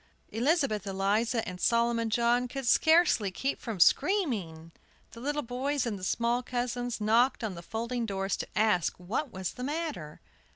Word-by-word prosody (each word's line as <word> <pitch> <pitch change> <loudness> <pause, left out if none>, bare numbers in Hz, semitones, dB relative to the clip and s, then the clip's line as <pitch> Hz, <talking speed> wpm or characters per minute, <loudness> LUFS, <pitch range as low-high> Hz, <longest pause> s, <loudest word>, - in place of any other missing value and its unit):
Elizabeth 235 - 0
Eliza 210 +5 0
and 180 0 -7
Solomon 235 -1 +2
John 240 +2 +2
could 270 +1 -6
scarcely 315 - +4
keep 265 +9 -3
from 225 -6 -5
screaming. 205 - +1 0.4
The 230 - -11
little 290 +4 -2
boys 260 +3 -2
and 215 -4 -3
the - - -12
small 235 +5 0
cousins 245 -1 -3
knocked 230 +4 +2
on 215 -3 -2
the 170 - -8
folding 230 +5 -3
doors 195 -1 -1
to - - -5
ask 210 -5 +2
what 230 +10 -3
was 190 -2 -4
the 250 - -7
matter. 290 - -4
235 Hz, 160 wpm, -29 LUFS, 200-255 Hz, 0.4 s, scarcely